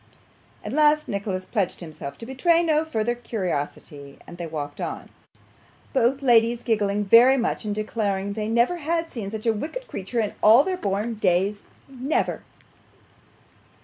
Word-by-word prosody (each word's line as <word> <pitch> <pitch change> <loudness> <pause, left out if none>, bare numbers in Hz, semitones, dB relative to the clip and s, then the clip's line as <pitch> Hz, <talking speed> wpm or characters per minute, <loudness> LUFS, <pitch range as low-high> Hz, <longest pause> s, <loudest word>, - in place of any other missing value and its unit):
At 210 - -4
last 300 0 +3
Nicholas 195 -2 -3
pledged 200 -4 -2
himself 155 -4 -8
to - - -9
betray 330 +7 +2
no 310 -2 +2
further 240 -7 -1
curiosity, 150 -10 -5
and 175 - -12
they 170 - -4
walked 145 -2 -6
on: - - -5 0.8
both 265 +1 +2
ladies 235 -1 +4
giggling 205 -3 0
very 240 +6 +7
much, 235 -2 -2
and 205 -1 -2
declaring 205 -2 -2
that - - -3
they 215 0 -3
never 235 +9 +2
had 330 +1 -2
seen 215 -5 -5
such 215 +1 -6
a 225 - +3
wicked 320 - -5
creature 200 +5 -4
in 215 -2 -1
all 225 +6 +7
their 375 +3 -1
born 210 - -2
days 200 0 +1 0.3
never. 270 +3 -2
225 Hz, 155 wpm, -24 LUFS, 200-265 Hz, 0.8 s, very